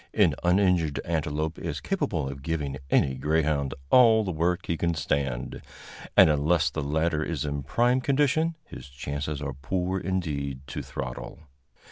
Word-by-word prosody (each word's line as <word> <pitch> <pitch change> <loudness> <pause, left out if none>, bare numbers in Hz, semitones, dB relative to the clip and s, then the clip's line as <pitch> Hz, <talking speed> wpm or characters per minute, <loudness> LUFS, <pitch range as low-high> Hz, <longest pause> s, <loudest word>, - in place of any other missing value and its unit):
An - - +4
uninjured 90 -4 +2
antelope 80 -1 -2
is - - -4
capable 65 - -1
of 70 0 -7
giving 70 -2 -3
any 65 - +3
greyhound 75 -1 0 0.2
all 115 -3 +7
the 95 - -2
work 85 +2 0
he 85 - -1
can 85 +1 0
stand, 70 -3 -2 0.6
and - - +9
unless 75 +2 +2
the 80 - -3
latter 75 +2 0
is 75 -4 -3
in 70 -1 -2
prime 120 - +2
condition 145 +5 +2
his 65 - -10
chances 70 +2 -4
are 70 -1 -3
poor 90 +7 -2
indeed 75 -8 -3
to - - -5
throttle. - - -6
80 Hz, 150 wpm, -27 LUFS, 70-90 Hz, 0.6 s, and